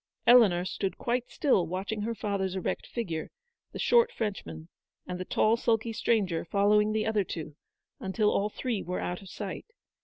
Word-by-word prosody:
Eleanor 205 -8 +6
stood 190 +1 -3
quite 245 +1 -1
still 260 - +2
watching 195 +5 -3
her 230 +2 -2
father's 195 -3 -2
erect 190 - -3
figure, 170 -10 -4 0.4
the - - -7
short 475 0 +4
Frenchman, 85 - -5 0.4
and 180 0 -5
the 185 - -4
tall, 220 +5 +2
sulky 230 -1 0
stranger 205 -7 +1
following 210 +3 +3
the 215 0 0
other 215 -2 +1
two, 155 -4 -6 0.4
until 210 +2 +1
all 205 +1 +1
three 230 -2 -3
were 180 - -3
out 180 +2 -3
of 195 - -12
sight. 200 - -6
205 Hz, 165 wpm, -29 LUFS, 185-225 Hz, 0.4 s, Eleanor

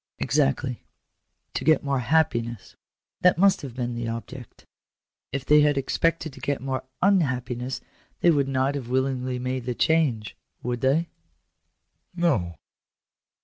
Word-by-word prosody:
" - - -67
Exactly. 125 - +1 0.7
To - - -3
get 155 -1 +4
more 140 -2 0
happiness: 120 -6 0 0.4
that 180 -1 +4
must 195 +2 +4
have 130 -4 -8
been 120 -1 -2
the 120 0 -3
object 115 +2 -7 0.7
If 135 +1 -3
they 150 +2 +6
had 145 -1 +3
expected 160 +2 0
to - - -12
get 140 -1 -1
more 130 0 -3 0.2
ttfthappiness, 130 -9 +1 0.4
they 175 - +6
would 140 -3 +2
not 135 +1 +1
have 135 -4 -5
willingly 130 -1 0
made 125 0 -3
the 125 -1 -2
change, 140 - +1 0.3
would 120 0 -2
they? 150 +6 +2 0.5
" - - -42
"No." 130 - +1
130 Hz, 145 wpm, -25 LUFS, 125-150 Hz, 0.7 s, they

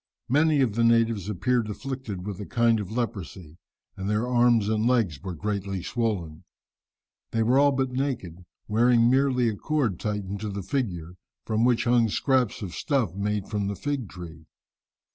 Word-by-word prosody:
Many 150 +2 +3
of 120 -6 +1
the 115 +2 +1
natives 115 -4 +2
appeared 110 +3 0
afflicted 115 -5 -5
with 100 -3 -5
a 105 - -5
kind 115 -1 +2
of 100 -3 -5
leprosy, 95 -8 -5 0.4
and 95 +1 -4
their 105 +3 0
arms 120 -3 +3
and 110 +1 +1
legs 110 - +1
were 90 -1 -5
greatly 100 0 -3
swollen. 95 -10 -2 0.9
They 115 -1 0
were 125 +4 +3
all 145 0 +5
but 135 -1 -1
naked, 125 -11 -3 0.2
wearing 120 +2 +4
merely 130 -2 +3
a 110 - 0
cord 125 - -1
tightened 100 -2 -3
to 105 +1 -4
the 100 -1 -5
figure, 90 - -3 0.3
from 110 +1 +1
which 125 -2 +3
hung 120 -2 +3
scraps 130 -1 +1
of 90 -3 -6
stuff 130 - 0
made 100 +1 -2
from 105 -2 -2
the 100 - -2
fig 140 -3 -3
tree. 80 -3 -10
110 Hz, 170 wpm, -26 LUFS, 100-125 Hz, 0.9 s, all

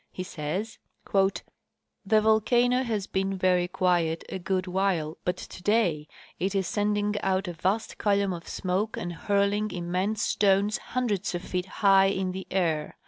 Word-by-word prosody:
He 185 - -5
says: 185 +6 -4
" - - -24 0.9
The 215 +1 +4
volcano 240 +3 +3
has 220 -6 -2
been 195 0 -1
very 180 -1 +2
quiet 175 -3 +1
a 190 - -4
good 185 0 -1
while, 180 -4 -1
but 180 +1 -1
today 180 -6 0 0.3
it 190 +3 -1
is 195 -1 +1
send 205 +2 0
ing 210 0 -1
out 190 0 0
a 175 - -4
vast 190 +7 -2
column 200 -2 +2
of 170 -1 -8
smoke 195 +4 -2
and 175 0 -4
hurling 200 +3 +1
immense 185 +4 -2
stones 200 +1 +2
hundreds 210 -8 -2
of 175 - -4
feet 180 0 -3 0.2
higli 195 -1 +5
in 190 -1 -1
the 190 +1 -6
air. 165 -5 -1
190 Hz, 160 wpm, -27 LUFS, 180-205 Hz, 0.9 s, higli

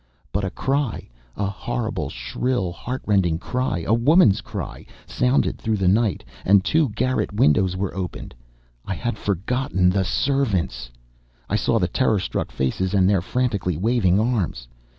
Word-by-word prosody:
But 100 - -1
a 95 - -1
cry, 135 +5 -2 0.3
a 100 - 0
horrible, 100 - -3
shrill, 90 - -2
heartrending 95 -4 0
cry, 105 -3 -2
a 110 - +2
woman's 120 - +5
cry, - - -6 0.2
sounded 125 +2 +1
through 110 -2 -1
the 95 -2 +1
night, 105 +1 +2 0.2
and 100 0 +4
two 155 -4 +2
garret 125 +4 -1
windows 95 -1 +2
were 95 0 -2
opened! 95 -2 -5 0.5
I 95 - -4
had 120 +6 -2
forgotten 100 -1 0
the 95 +1 +1
servants! 100 - 0 0.6
I - - 0
saw - - +2
the - - +1
terrorstruck - - 0
faces, 90 +9 -1
and 95 -2 +4
their 100 -2 +3
frantically 100 -5 -1
waving 100 -2 +2
arms!... 105 - -1
100 Hz, 145 wpm, -23 LUFS, 90-120 Hz, 0.6 s, woman's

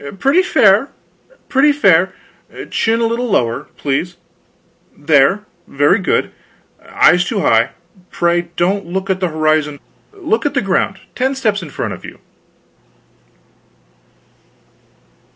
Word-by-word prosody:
"Pretty 275 - +3
fair 215 - +3 0.6
pretty 280 +2 +3
fair. 190 - +3 0.6
Chin 225 +1 0
a - - +2
little 235 +2 -1
lower, 130 - 0
please 160 +5 -3 0.8
there, 150 +7 +2 0.2
very 145 +9 +2
good. 190 - -1 0.5
Eyes 180 0 +3
too 200 +2 -2
high; 115 -2 +2 0.4
pray 175 0 0
don't 190 +2 -1
look 190 +2 -3
at 190 - -1
the 185 - 0
horizon, 155 -2 0 0.3
look 315 - -2
at 290 -1 -2
the 275 - +2
ground, 195 0 0 0.2
ten 265 +2 -1
steps 215 -6 -1
in 170 - -9
front - - -4
of - - -11
you. - - -10
190 Hz, 120 wpm, -16 LUFS, 155-230 Hz, 0.8 s, Pretty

